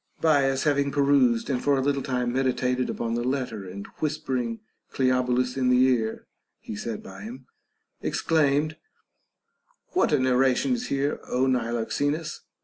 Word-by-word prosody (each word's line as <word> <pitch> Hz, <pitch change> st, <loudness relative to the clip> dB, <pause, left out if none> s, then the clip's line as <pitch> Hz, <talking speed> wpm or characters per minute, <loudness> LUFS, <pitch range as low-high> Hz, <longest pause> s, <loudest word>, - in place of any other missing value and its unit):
Bias, 135 Hz, -4 st, +3 dB
having 140 Hz, -2 st, +2 dB
perused 140 Hz, -5 st, +3 dB
and 130 Hz, -3 st, -1 dB
for 140 Hz, -1 st, +3 dB
a -, -, +1 dB
little 140 Hz, 0 st, 0 dB
time 125 Hz, -2 st, -1 dB
meditated 130 Hz, -1 st, 0 dB
upon 115 Hz, -1 st, -2 dB
the 120 Hz, 0 st, -1 dB
letter, 125 Hz, -7 st, -3 dB
and 100 Hz, +2 st, -7 dB
whispering 130 Hz, -7 st, -2 dB, 0.3 s
Cleobulus 125 Hz, -1 st, +1 dB
in 130 Hz, -1 st, +2 dB
the 125 Hz, -, +5 dB
ear 115 Hz, -4 st, 0 dB, 0.3 s
(he -, -, -7 dB
sat 110 Hz, +1 st, -5 dB
by 95 Hz, 0 st, -10 dB
him), 125 Hz, +5 st, -9 dB, 0.6 s
exclaimed: 155 Hz, 0 st, +1 dB, 1.1 s
What 365 Hz, -, +1 dB
a 150 Hz, -, +4 dB
narration 130 Hz, -, +2 dB
is 245 Hz, 0 st, -2 dB
here, 140 Hz, +1 st, -1 dB
Ο 125 Hz, +1 st, +1 dB
Niloxenus 130 Hz, +5 st, -1 dB
130 Hz, 140 wpm, -26 LUFS, 125-140 Hz, 1.1 s, the